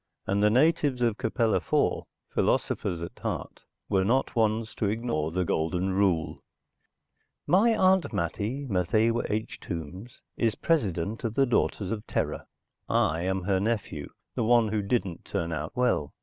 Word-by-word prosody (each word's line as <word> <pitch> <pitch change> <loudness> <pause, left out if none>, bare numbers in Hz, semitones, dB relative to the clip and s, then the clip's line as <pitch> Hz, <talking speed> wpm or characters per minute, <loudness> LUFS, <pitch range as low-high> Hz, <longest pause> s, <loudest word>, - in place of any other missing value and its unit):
And 100 +1 +1
the 105 - +5
natives 140 0 +3
of 115 -3 +1
Capella 115 0 +1
IV, - - 0 0.3
philosophers 85 -2 0
at 85 - -8
heart, - - -5 0.2
were 95 -1 +2
not 125 +7 +1
ones 110 0 +1
to 105 - 0
ignore 105 -9 -1
the 90 +1 0
Golden 90 +4 0
Rule...._ 95 -5 +1 1.1
My 220 +5 +4
Aunt 190 -1 +3
Mattie, 105 - -2
Matthewa 110 +2 +1
H. 110 +1 -3
Tombs, 90 - -7
is 115 -3 +1
President 105 - 0
of 115 -2 -2
the 135 - +4
Daughters 100 -4 0
of 110 -2 -4
Terra. - - -2 0.4
I 80 +2 +2
am 95 +1 -1
her 95 0 +1
nephew, 100 -8 -2 0.2
the - - -1
one 115 -1 +4
who 105 0 0
didn't 100 -4 -1
turn 85 0 -3
out 75 0 -4
well. 125 - +1
105 Hz, 150 wpm, -27 LUFS, 90-120 Hz, 1.1 s, the